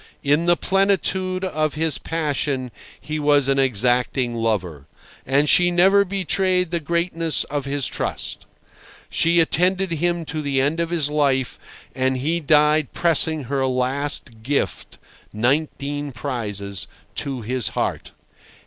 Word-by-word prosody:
In 150 +4 +2
the 175 0 +4
plenitude 190 -1 0
of 155 -4 -1
his 160 -1 0
passion 145 -5 -2 0.3
he 155 0 -4
was 145 -2 +3
an 135 0 +2
exacting 125 0 +1
lover. 95 -11 -2 0.4
And 140 +3 +2
she 175 +3 +5
never 190 +3 +5
betrayed 185 -2 0
the 170 - 0
greatness 165 0 -1
of 145 -2 -2
his 140 -1 -1
trust! - - -4 0.6
She 170 +1 +3
attended 180 +4 +2
him 170 +1 -1
to 155 0 -4
the 140 -2 0
end 145 +5 0
of 170 -1 -1
his 160 -4 +1
life, 135 -4 0 0.3
and 130 0 0
he 160 +6 0
died 150 -1 +3
pressing 160 -2 +2
her 135 +1 -1
last 130 -2 -1
gift 140 +5 -2 0.4
(nineteen 145 +4 -1
prizes) 105 -7 -4 0.3
to 135 -4 -3
his 125 +2 -1
heart. - - -2
145 Hz, 130 wpm, -22 LUFS, 130-170 Hz, 0.6 s, she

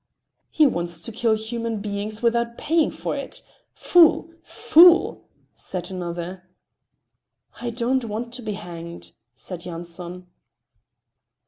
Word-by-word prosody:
"He 310 - +4
wants 170 - -1
to 230 - -6
kill 225 0 +1
human 225 0 -4
beings 210 +2 -4
without 235 0 +1
paying 320 0 +2
for - - -4
it. - - -6 0.3
Fool! 335 -1 +4
fool!" 345 +2 +5 0.3
said 180 -1 -6
another. 175 0 -5 1.2
"I 240 - -2
don't 240 +2 0
want 230 +2 -5
to 250 - -4
be 215 -2 -4
hanged," 170 -3 -9 0.2
said 170 +9 -7
Yanson. 175 +1 -7
215 Hz, 115 wpm, -23 LUFS, 175-240 Hz, 1.2 s, fool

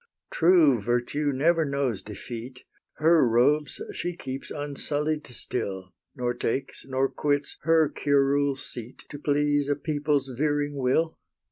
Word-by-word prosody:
True 160 - +5
Virtue 120 +6 0
never 160 +5 +3
knows 140 -8 -1
defeat: 120 +4 -8 0.3
HER 160 -4 +4
robes 145 +6 +2
she 175 0 -3
keeps 135 -3 -6
unsullied 150 +1 -3
still, 95 -5 -5 0.2
Nor 125 -2 -1
takes, 120 +2 -3
nor 135 0 +1
quits, 145 +1 -1
HER 160 -1 +5
curule 140 -1 +2
seat 120 -2 -8
To 145 - -7
please 145 0 +1
a 145 - +2
people's 145 -2 0
veering 145 +1 0
will. 140 +5 +1
145 Hz, 125 wpm, -26 LUFS, 125-150 Hz, 0.3 s, True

